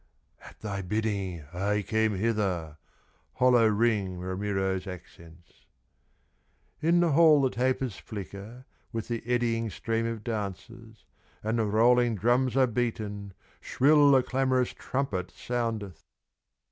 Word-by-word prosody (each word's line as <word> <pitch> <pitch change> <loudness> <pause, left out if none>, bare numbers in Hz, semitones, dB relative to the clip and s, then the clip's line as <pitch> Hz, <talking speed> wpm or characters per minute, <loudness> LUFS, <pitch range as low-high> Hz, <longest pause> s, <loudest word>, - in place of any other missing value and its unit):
"At - - -14
thy 100 -2 -4
bidding 95 -4 -2
I 100 +3 0
came 110 0 0
hither," 95 -7 -1 0.6
Hollow 125 -3 +4
ring 105 -4 +1
Ramiro's 95 +1 -2
accents. 85 -2 -13 1.1
In 170 +2 +3
the 170 -2 +2
hall 155 0 +6
the 130 - +2
tapers 130 -2 -1
flicker, 105 +4 -9 0.3
With 115 -2 -5
the 115 -1 -2
eddying 115 -2 0
stream 115 +2 -2
of 115 -2 -5
dancers, 110 +1 -6 0.4
And 110 +2 0
the 110 - +2
rolling 120 +2 +3
drums 120 +5 +1
are 130 - +6
beaten, 105 -4 -3 0.2
Shrill 145 +1 +4
the 135 -2 +5
clamorous 130 -1 0
trumpet 105 -10 -3
soundeth. 110 -5 -3
110 Hz, 120 wpm, -28 LUFS, 100-125 Hz, 1.1 s, hall